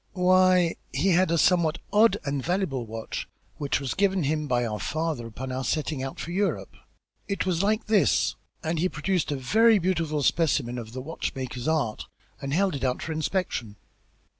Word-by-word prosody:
"Why, 185 -2 +4
he 155 +9 +1
had 185 0 +4
a 170 - +2
somewhat 170 -1 +3 0.2
odd 210 -1 +5
and 140 -1 -2
valuable 175 - -1
watch, 110 0 -5 0.3
which 140 -3 0
was 135 -2 -3
given 195 -3 +1
him 150 +1 -1
by 120 -2 +1
our 105 -2 -3
father 155 - -2
upon 130 +4 -6
our 130 +1 -3
setting 150 +1 -1
out 135 0 -5
for 170 - -5
Europe. 195 +3 -1 0.5
It 200 - -1
was 180 -2 +1
like 215 +2 +1
this," 105 - +3 0.3
and 160 0 -1
he 185 +3 +2
produced 165 +1 -1
a - - 0
very 220 - +4
beautiful 165 -5 0
specimen 135 -6 +1
of 115 -1 -9
the 130 - -5
watchmaker's 130 -3 -4
art, 155 -9 0 0.3
and 140 - -4
held 190 +4 +2
it 140 - -4
out 125 -1 0
for 160 - -4
inspection. 155 - -2
155 Hz, 180 wpm, -26 LUFS, 130-185 Hz, 0.5 s, odd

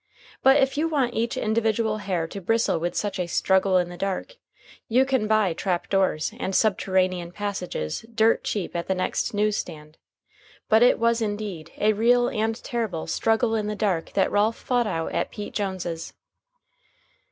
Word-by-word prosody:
But 270 +1 +6
if 270 +1 +1
you 325 - +2
want 275 -7 0
each 235 +2 -1
individual 220 -1 0
hair 185 -5 -2
to 195 +4 -7
bristle 225 -2 +1
with 175 +2 -2
such 205 -2 -2
a 180 - -1
"Struggle 190 +2 +2
in 175 -1 +1
the 175 - -9
Dark," 195 - -3 0.5
you 255 +4 +3
can 260 -5 0
buy 215 -5 +2
trap 175 +1 -2
doors 190 -6 +1
and 190 - -2
subterranean 185 -4 +1
passages 185 - -4
dirt 225 0 +3
cheap 200 -5 -3
at 170 - -3
the 190 - +1
next 185 +3 -1
news 210 0 +1
stand. 155 -2 -7 0.7
But 220 +1 +4
it 245 - +5
was, 230 0 +2
indeed, 205 -7 -4
a 215 +1 +3
real 240 +3 +3
and 220 +1 -1
terrible 220 -9 -3
"Struggle 225 +1 +1
in 215 -2 0
the 210 - -2
Dark" 190 -6 -1
that 195 - +2
Ralph 215 +2 +2
fought 245 -2 0
out 165 -5 -2
at - - -1
Pete 205 -1 -7
Jones's. 185 -5 -4
205 Hz, 175 wpm, -25 LUFS, 185-225 Hz, 0.7 s, But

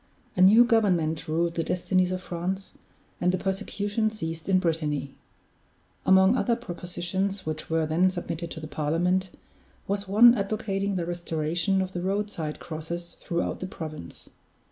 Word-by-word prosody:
A 180 - +1
new 215 +6 +8
government 180 -10 +2
ruled 165 +2 0
the 165 - -1
destinies 185 +1 +1
of 185 0 -3
France, 185 +3 -4 0.5
and 180 - +3
the 185 - 0
persecution 205 +3 -1
ceased 165 -5 -5
in 190 - +5
Brittany. 155 -5 -1 0.9
Among 190 +4 +6
other 240 -2 +2
propositions 185 -1 -3
which 155 0 -4
were 160 0 +1
then 170 +4 +3
submitted 170 -2 -4
to 160 - -7
the 155 - -7
Parliament, 170 +6 0 0.6
was 200 0 -2
one 230 +5 +8
advocating 200 -2 -1
the 175 -2 -1
restoration 175 +2 0
of 185 0 -7
the 175 - -3
road 200 +3 -1
side 155 -5 -5
crosses 170 +2 -6
throughout 170 -2 -2
the 185 - -4
province. 155 - -8
180 Hz, 150 wpm, -27 LUFS, 165-195 Hz, 0.9 s, new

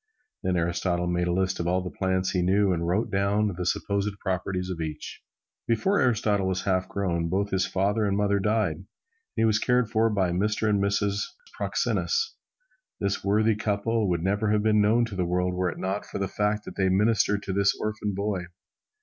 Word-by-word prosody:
Then 95 -2 0
Aristotle 85 +1 0
made 90 0 0
a - - +1
list 95 +1 0
of 85 - -1
all 90 +1 +1
the 90 - -7
plants 95 -1 0
he 90 - +1
knew 95 +2 +3
and 85 -1 -2
wrote 95 +6 0
down 100 +1 +1
the 90 0 -3
supposed 100 +2 -1
properties 95 -1 -2
of 85 -2 -4
each. 75 -1 -6 0.5
Before 120 - +2
Aristotle 105 -5 +2
was 95 -1 -1
half 95 -2 0
grown, 85 -4 -1
both 100 +3 -1
his 95 0 +1
father 100 +3 +1
and 100 0 0
mother 100 -1 +2
died, 105 -5 +1
and 90 - -13 0.5
he 115 - +2
was 110 -1 +3
cared 125 -2 +1
for 115 0 +3
by 100 -4 +1
a - - -2
Mr. 105 +4 0
and 105 -2 +2
Mrs. 100 0 0 0.3
Proxenus. 455 -1 0 0.7
This 100 -1 -1
worthy 105 +2 +3
couple 105 0 0
would 85 -2 0
never 100 +3 +1
have 105 0 +2
been 110 -1 +4
known 115 +3 +3
to 110 -4 -7
the 90 - 0
world 90 +1 0
were 90 0 0
it - - -7
not 95 +2 -3
for - - -5
the 100 -1 -1
fact 105 +2 -1
that - - -9
they 95 -1 +2
ministered 105 +1 +2
to 95 - -3
this 100 0 +2
orphan 105 -2 -2
boy. 100 -2 -2
100 Hz, 205 wpm, -26 LUFS, 90-105 Hz, 0.7 s, been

